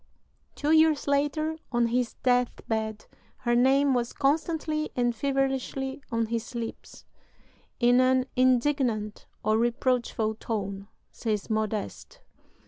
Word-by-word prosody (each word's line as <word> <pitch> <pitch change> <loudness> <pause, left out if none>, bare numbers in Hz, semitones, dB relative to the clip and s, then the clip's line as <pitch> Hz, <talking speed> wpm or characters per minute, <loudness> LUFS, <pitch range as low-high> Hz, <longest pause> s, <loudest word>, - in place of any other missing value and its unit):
Two 295 +1 0
years 315 -2 +4
later, 295 +3 0
on 240 -1 +2
his 240 0 -1
death 250 -1 +1
bed, 220 -1 -2 0.4
her 240 - +1
name 270 +3 +4
was 240 -1 -1
constantly 305 +1 0
and 240 -1 +1
feverishly 270 +1 -1
on 230 -1 +1
his 230 +2 -4
lips, 230 -1 -7 0.7
"in 245 +1 +5
an 255 0 +3
indignant 250 -4 +1 0.2
or 215 +1 +2
reproachful 235 -2 0
tone," 200 -3 -4 0.2
says 215 -1 -3
Modeste. 220 - -3
250 Hz, 115 wpm, -27 LUFS, 225-275 Hz, 0.7 s, in